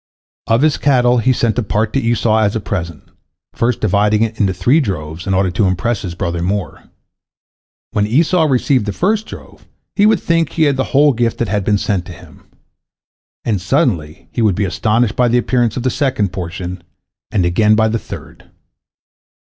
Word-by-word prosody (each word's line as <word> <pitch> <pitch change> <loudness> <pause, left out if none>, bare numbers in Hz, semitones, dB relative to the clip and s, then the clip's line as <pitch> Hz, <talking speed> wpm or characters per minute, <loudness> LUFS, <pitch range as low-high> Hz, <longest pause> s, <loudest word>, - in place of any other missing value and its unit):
Of 115 +4 +2
his 155 -2 +3
cattle 125 -3 +3
he 130 +3 +2
sent 120 -2 0
a - - +2
part 105 0 -1
to 135 - +2
Esau 115 -1 +1
as 105 -1 +1
a - - 0
present, 85 -6 -5 0.5
first 120 +1 -1
dividing 105 +1 +2
it 110 -1 -3
into 100 -2 +2
three 120 - +2
droves 90 - -4
in 95 - +1
order 95 -1 +1
to 95 +3 +1
impress 95 +5 -1
his 90 -3 -6
brother 85 0 -3
more. 95 0 -3 1.1
When 105 0 0
Esau 160 - +2
received 130 -4 +1
the 105 - -2
first 210 - 0
drove, - - -12 0.3
he 205 0 +4
would 215 -3 +3
think 165 -2 0
he 160 - +1
had 145 -3 +2
the 130 0 -1
whole 145 +1 +3
gift 120 -1 -1
that 115 - -2
had 105 0 0
been 105 +2 +2
sent 95 -3 -2
to - - -8
him, - - -17 1.0
and 105 -6 0
suddenly 95 - -1
he - - -2
would 105 -5 +2
be 100 - 0
astonished 110 +4 0
by 125 - +2
the 120 +1 +2
appearance 120 -1 0
of 125 - -3
the 130 - +1
second 130 - -1
portion, 90 0 -6 0.5
and 95 -4 0
again 105 +5 +3
by 110 0 +3
the 115 +1 -1
third. - - -11
110 Hz, 195 wpm, -16 LUFS, 95-125 Hz, 1.1 s, he